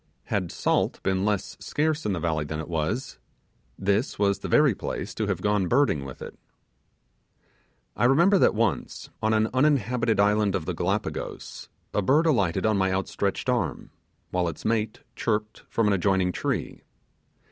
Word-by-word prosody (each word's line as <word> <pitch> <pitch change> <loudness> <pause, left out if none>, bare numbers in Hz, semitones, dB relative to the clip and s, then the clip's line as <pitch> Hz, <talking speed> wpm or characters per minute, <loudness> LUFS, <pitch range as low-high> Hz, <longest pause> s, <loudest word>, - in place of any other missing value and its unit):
Had 90 -5 -2
salt - - 0
been 95 0 +1
less 105 -3 -1
scarce 155 -2 -1
in 100 - 0
the 90 - -2
valley 80 -2 0
than 75 +1 -5
it 80 - -5
was, 85 +10 -2 0.6
this 100 +6 0
was 100 -1 +1
the - - -5
very 150 -5 +4
place - - -5
to - - -2
have - - -2
gone 105 -3 +2
birding 120 - +2
with 65 - -8
it. - - -10 1.6
I - - +1
remember 170 +10 +5
that - - +4
once, 110 -3 -1
on 110 - +1
an 110 0 +2
uninhabited 125 -5 +2
island 105 0 +3
of 80 - -2
the - - -2
Gallipagos, - - -3 0.2
a 105 - +1
bird 145 - +3
alighted 100 - +2
on 110 -2 +3
my 95 0 +2
outstretched 95 +3 -2
arm, 110 - -1 0.4
while 90 -1 0
its 85 - -6
mate 110 -1 0
chirped 105 -1 -2
from 115 - +1
an 105 - +3
adjoining 95 -1 +2
tree. - - -3
105 Hz, 165 wpm, -26 LUFS, 95-120 Hz, 1.6 s, remember